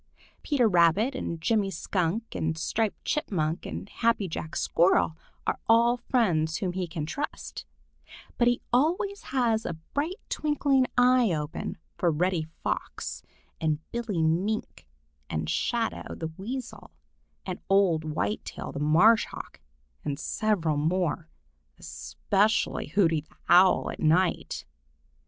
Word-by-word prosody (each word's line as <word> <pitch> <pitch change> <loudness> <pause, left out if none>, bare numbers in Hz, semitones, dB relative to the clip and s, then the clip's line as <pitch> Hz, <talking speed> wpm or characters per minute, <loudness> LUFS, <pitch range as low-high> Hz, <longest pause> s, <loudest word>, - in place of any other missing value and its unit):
Peter 265 -6 +2
Rabbit 180 +7 +4
and 170 -10 -4
Jimmy 205 +3 +1
Skunk 190 +4 -2
and 160 0 -1
Striped 215 +6 -1
Chipmunk 175 - -1
and - - -6
Happy 230 -2 +1
Jack 160 -1 -5
Squirrel 170 -2 +3 0.3
are - - -1
all 235 +2 +5
friends 175 -11 +1
whom 185 -3 -2
he 180 -1 -2
can 160 -2 -4
trust, 285 - -5 0.7
but 240 - +4
he 245 0 +2
always 355 +10 +1
has 235 -4 +1
a - - -3 0.2
bright 310 +6 -1
twinkling 285 -4 +1
eye 245 -3 +5
open 150 -2 -3 0.2
for 175 - +3
Reddy 165 0 0 0.2
Fox - - -3 0.4
and 155 -2 +1
Billy 220 -8 -1
Mink 185 +7 -1 0.4
and 80 0 -2
Shadow 230 - -1
the 160 -1 -5
Weasel 240 +6 -6 0.6
and 185 -2 -4
old 190 -5 +4
Whitetail 155 +7 -3
the - - -5
Marsh 175 +10 +5
Hawk, - - -9 0.4
and 140 -1 -2
several 170 -7 0
more, 165 +1 0 0.5
especially 210 +3 0
Hooty 165 -2 +2
the 150 - -26
Owl 180 +2 +5
at - - -9
night. 175 +4 +1
190 Hz, 125 wpm, -27 LUFS, 160-235 Hz, 0.7 s, all